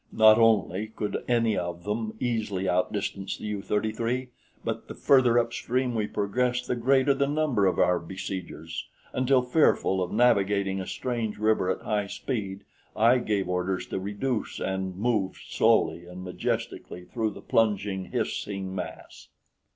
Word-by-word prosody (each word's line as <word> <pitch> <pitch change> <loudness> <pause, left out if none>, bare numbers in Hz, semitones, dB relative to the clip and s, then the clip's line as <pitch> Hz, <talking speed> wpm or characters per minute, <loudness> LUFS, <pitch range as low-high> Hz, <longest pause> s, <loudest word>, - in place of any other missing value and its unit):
Not 110 0 +7
only 110 -3 +3
could 105 -1 -4
any 115 -3 +2
of 85 -1 -3
them 110 +2 -3
easily 105 -6 -1
outdistance 95 +1 -1
the - - -8
U 105 -2 -3
33, 115 +5 -1 0.4
but - - -3
the - - -8
further 125 -4 +4
upstream 125 +1 0
we 110 -2 0
progressed 125 +5 0
the - - 0
greater 130 +3 +3
the 140 +1 +1
number 145 -9 +2
of 95 - +1
our 90 -1 +3
besiegers, 85 -2 -6 0.3
until 130 0 +3
fearful 125 -8 +3
of 90 - -2
navigating 100 -4 +2
a 95 - -6
strange 115 -4 -3
river 110 -3 +2
at 95 - -1
high 105 -2 0
speed, 100 -3 -4 0.3
I 115 +3 +5
gave 105 -5 -1
orders 90 +1 -1
to - - -2
reduce 105 +5 -3
and 95 -1 -2
moved 105 -2 -1
slowly 85 +1 +2
and 90 +1 -8
majestically 90 -1 -4
through 110 +1 -1
the 105 - -10
plunging, 100 -4 +1
hissing 95 -2 -3
mass. 90 -2 -7
105 Hz, 150 wpm, -27 LUFS, 95-120 Hz, 0.4 s, Not